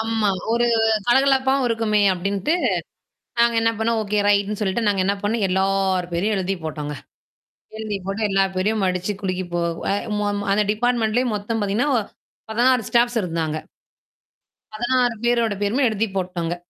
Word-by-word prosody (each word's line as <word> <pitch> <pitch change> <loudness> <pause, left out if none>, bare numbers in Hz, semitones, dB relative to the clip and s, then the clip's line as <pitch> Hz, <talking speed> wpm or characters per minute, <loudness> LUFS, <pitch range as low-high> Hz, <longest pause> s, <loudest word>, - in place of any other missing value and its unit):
ஆமா. 225 -1 0 0.2
ஒரு 240 +1 +2 0.4
கலகலப்பா 265 +1 +3
இருக்குமே 225 -2 +1
அப்படின்ட்டு 200 - -1 0.9
நாங்க 235 0 +4
என்ன 225 0 +3
பண்ணுனோம், 225 0 +1
ஓகே! 210 0 -1
ரைட்ன்னு 205 0 +2
சொல்லிட்டு 210 +3 0
நாங்க 200 -2 +2
என்ன 200 +2 +1
பண்ணுனோம் 210 +1 0
எல்லாப் 190 -1 +1
பேரையும் 205 +5 0
எழுதிப் 190 -2 -2
போட்டோம்ங்க. 150 -2 -4 0.8
எழுதிப் 210 -4 -4
போட்டு 195 +3 -3
எல்லாப் 195 -1 +1
பேரையும் 205 +3 0
மடிச்சிக் 185 +2 -2
குலுக்கிப் 185 -2 -3
போ 175 - 0 0.6
ம 205 0 0 0.2
அந்த 210 - +3
டிபார்ட்மெண்ட்லேயும் 235 +1 +1
மொத்தம் 215 +2 -3
பார்த்தீங்கன்னா, 210 +8 0
ஒ - - +3 0.5
16 245 +1 +3
ஸ்டாஃப்ஸ் 240 0 +2
இருந்தாங்க. 165 -3 -2 1.2
16 245 +2 +1
பேர்களோட 235 -3 +2
பேருமே 250 +7 +2
எழுதி 220 +1 -1
போட்டுடோம்ங்க. 175 -2 -2
210 Hz, 140 wpm, -22 LUFS, 190-230 Hz, 1.2 s, நாங்க